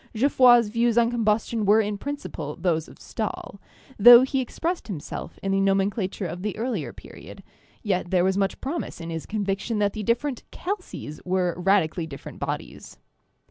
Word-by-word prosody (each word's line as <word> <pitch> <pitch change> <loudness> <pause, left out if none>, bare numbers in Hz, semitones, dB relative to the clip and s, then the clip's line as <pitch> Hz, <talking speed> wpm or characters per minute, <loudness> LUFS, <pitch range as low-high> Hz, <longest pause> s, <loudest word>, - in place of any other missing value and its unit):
Geoffroy's 240 -2 +5
views 230 +1 +1
on 235 0 +4
combustion 225 -1 0
were 205 +2 +5
in 210 -1 0
principle 200 - -5
those 165 -3 -1
of - - -15
Stahl, 210 -2 -6 0.4
though 240 +3 +10
he 265 0 0
expressed 335 +8 -3
himself 175 -9 -7
in 195 - -1
the 195 - +2
nomencla 195 0 +1
ture 190 -1 -5
of 175 +2 -6
the 210 +1 -3
earlier 215 - -3
period; - - -13 0.4
yet 185 -4 -1
there 180 -1 +2
was 190 +1 +2
much 195 0 -1
promise 300 - -4
in 165 0 -6
his 165 -1 -5
conviction 205 +1 -2
that 205 -1 +1
the 215 - -5
different 240 +4 -1
'calces' 365 - -6
were 180 -1 0
radically 180 -3 +1
different 140 -3 -10
bodies. - - -6
205 Hz, 170 wpm, -25 LUFS, 185-235 Hz, 0.4 s, though